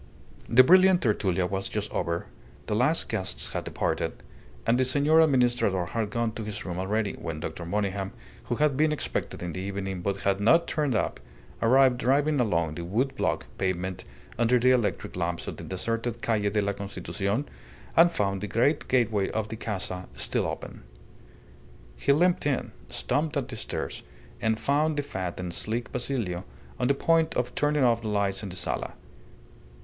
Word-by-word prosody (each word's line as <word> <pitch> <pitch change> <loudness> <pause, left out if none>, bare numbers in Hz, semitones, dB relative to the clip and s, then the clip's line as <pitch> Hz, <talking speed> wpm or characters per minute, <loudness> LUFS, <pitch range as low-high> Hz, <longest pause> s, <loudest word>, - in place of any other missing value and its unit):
The 130 +2 +8
brilliant 185 +3 +6
tertulia 95 -6 +1
was 95 +1 -2
just 105 0 -3
over, 85 0 -2 0.4
the 105 - -1
last 130 +9 +3
guests 95 -4 -2
had - - -3
departed, - - -1 0.5
and 120 +2 +3
the - - +4
Senor 145 +5 +4
Administrador 120 - +2
had 110 0 -1
gone 115 +1 -1
to 110 - -6
his 105 -1 -5
room 90 -1 -4
already, 105 +3 0
when 85 -2 -5
Dr. 85 +1 -5
Monygham, 100 0 -1 0.3
who 120 - -1
had 150 +1 +2
been 155 +2 +3
expected 150 - -3
in 85 -2 -4
the 95 - -4
evening 95 -1 -4
but 100 +2 -1
had 100 0 +1
not 165 +11 +5
turned 145 -6 0
up, - - -1 0.4
arrived 125 +1 +5
driving 140 +4 +2
along 85 -9 +1
the 85 - -5
wood 115 +10 -1
block - - -1
pavement 95 -1 -2 0.4
under 120 +1 +4
the 125 +1 +4
electric 120 -4 0
lamps 85 0 -2
of - - -5
the - - -8
deserted 115 +4 -2
Calle 105 -3 +1
de 105 +1 +1
la 100 0 0
Constitucion, 100 +4 -3 0.5
and 170 +1 +7
found 100 - -1
the 105 - -3
great 125 - +1
gateway 115 -6 +2
of 110 -1 -2
the 110 - -4
Casa 95 -4 -4
still - - -1
open. - - -6 1.1
He 140 - +1
limped 175 +2 +3
in, 140 -3 -1 0.2
stumped 155 +1 0
up 130 -2 -2
the 125 - -5
stairs, - - -4 0.4
and 110 -1 +1
found 150 +2 +1
the 145 - 0
fat 95 -10 -4
and 90 -1 -4
sleek 115 +6 -2
Basilio 115 -9 -2 0.4
on 125 - +1
the 140 - +3
point 165 +2 +2
of 125 0 -1
turning 150 -1 +2
off 115 -2 +3
the 110 - -4
lights 100 -2 0
in 100 - -5
the 90 - -5
sala. 90 - -2
110 Hz, 180 wpm, -27 LUFS, 95-135 Hz, 1.1 s, The